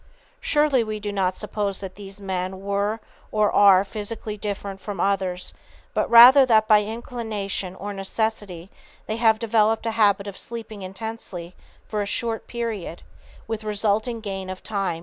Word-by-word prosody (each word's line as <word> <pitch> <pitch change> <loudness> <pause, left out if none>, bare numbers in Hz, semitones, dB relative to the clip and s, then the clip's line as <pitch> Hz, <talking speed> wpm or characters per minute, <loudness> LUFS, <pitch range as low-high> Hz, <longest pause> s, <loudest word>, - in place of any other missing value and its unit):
Surely 295 - +2
we 215 -1 -4
do 205 0 -4
not 190 -2 0
suppose 205 -2 -2
that 190 -2 -7
these 195 0 -10
men 190 -1 -3
were 200 +2 -1 0.3
or 215 -1 +2
are 195 -2 +6
physically 210 +1 -5
different 200 -1 -5
from 205 -4 -6
others, 190 -2 -1 0.4
but - - 0
rather 250 +4 +10
that 220 -4 +4
by 210 -1 +6
inclination 215 -4 -4
or 205 +2 -6
necessity 195 -2 -3 0.3
they 220 - -3
have 225 -1 +4
developed 225 0 +2
a 225 - 0
habit 205 -3 +3
of 200 -2 -5
sleeping 220 -3 -7
intensely 190 -3 -7 0.3
for 210 -1 -2
a 200 - -2
short 225 +2 -2
period, 225 -8 -4 0.4
with 220 -1 -4
resulting 215 +2 0
gain 195 -3 -5
of 185 0 -7
time 215 - -6
and 190 - 0
efficiency." 165 - -7
210 Hz, 165 wpm, -24 LUFS, 195-225 Hz, 0.4 s, rather